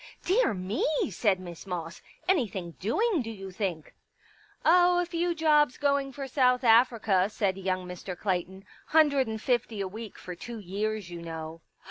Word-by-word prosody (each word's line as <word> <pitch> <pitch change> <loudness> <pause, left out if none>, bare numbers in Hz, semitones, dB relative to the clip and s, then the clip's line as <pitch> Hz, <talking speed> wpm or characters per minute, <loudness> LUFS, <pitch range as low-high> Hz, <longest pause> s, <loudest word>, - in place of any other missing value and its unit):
" - - -34
Dear 380 - +3
me! 185 +4 -2 0.2
" - - 0
said 195 0 +1
Miss 175 0 -9
Moss. 170 -2 -5
" - - -32
Anything 215 - 0
doing, 385 - +1
do 225 - -5
you 195 -3 -8
think? 180 -5 -4 0.3
" - - -30
" - - -28
Oh, 355 +1 +5
a 355 - +1
few 345 0 -1
jobs 300 -4 +3
going 280 -1 +1
for 275 +1 -6
South 255 -1 +2
Africa," 225 -5 +4
said 200 -3 0
young 185 -1 -2
Mr. 180 0 -7
Clayton. 190 0 -2
" - - -29
Hundred 285 -5 +5
and 220 0 -4
fifty 235 -2 -1
a 195 - -1
week 220 +3 -8
for 180 - -7
two 230 +7 -8
years, 205 0 -3
you 170 -1 -7
know." 165 0 -7
215 Hz, 190 wpm, -28 LUFS, 185-275 Hz, 0.3 s, Oh